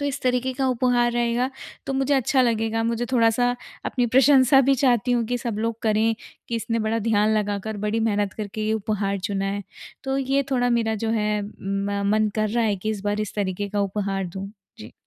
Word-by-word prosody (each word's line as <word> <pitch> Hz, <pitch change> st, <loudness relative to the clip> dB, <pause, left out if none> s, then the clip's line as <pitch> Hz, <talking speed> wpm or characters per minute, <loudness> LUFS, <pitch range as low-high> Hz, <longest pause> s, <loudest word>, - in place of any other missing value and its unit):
तो -, -, -2 dB
इस 280 Hz, -, -3 dB
तरीके 255 Hz, 0 st, +1 dB
का 265 Hz, +1 st, -1 dB
उपहार 245 Hz, -1 st, +2 dB
रहेगा 240 Hz, +2 st, 0 dB, 0.4 s
तो -, -, -2 dB
मुझे 270 Hz, +1 st, +1 dB
अच्छा 265 Hz, 0 st, +2 dB
लगेगा, 225 Hz, -1 st, 0 dB
मुझे 235 Hz, +1 st, -1 dB
थोड़ा-सा 235 Hz, 0 st, +3 dB, 0.4 s
अपनी 245 Hz, -1 st, 0 dB
प्रशंसा 265 Hz, +2 st, +5 dB
भी 270 Hz, +1 st, +3 dB
चाहती 250 Hz, -2 st, +2 dB
हूँ 235 Hz, -1 st, +2 dB
कि 245 Hz, +2 st, -1 dB
सब 235 Hz, -4 st, -4 dB
लोग 225 Hz, 0 st, -2 dB
करें 220 Hz, +1 st, +2 dB, 0.3 s
कि 235 Hz, -, -1 dB
इसने 230 Hz, 0 st, -2 dB
बड़ा 220 Hz, +1 st, 0 dB
ध्यान 215 Hz, 0 st, +2 dB
लगाकर 205 Hz, +1 st, -2 dB
बड़ी 225 Hz, +2 st, 0 dB
मेहनत 205 Hz, -3 st, 0 dB
करके 215 Hz, 0 st, -5 dB
ये 220 Hz, -, +1 dB
उपहार 205 Hz, -2 st, -1 dB
चुना 195 Hz, +1 st, -2 dB
है। 200 Hz, +1 st, -2 dB, 0.4 s
तो 270 Hz, 0 st, -1 dB
ये 275 Hz, +1 st, +1 dB
थोड़ा 245 Hz, -2 st, +2 dB
मेरा 230 Hz, -2 st, +1 dB
जो 225 Hz, -, 0 dB
है 210 Hz, -1 st, 0 dB
म 200 Hz, 0 st, -3 dB
मन 215 Hz, 0 st, +2 dB
कर 215 Hz, 0 st, +1 dB
रहा 235 Hz, +1 st, +1 dB
है 210 Hz, -2 st, +1 dB
कि 215 Hz, +3 st, -3 dB
इस 210 Hz, -3 st, -4 dB
बार 205 Hz, +1 st, 0 dB
इस 215 Hz, -, -4 dB
तरीके 200 Hz, 0 st, -2 dB
का 205 Hz, 0 st, -1 dB
उपहार 195 Hz, -1 st, -2 dB
दूँ। 190 Hz, +3 st, -7 dB, 0.3 s
जी। -, -, -10 dB
225 Hz, 210 wpm, -24 LUFS, 205-245 Hz, 0.4 s, प्रशंसा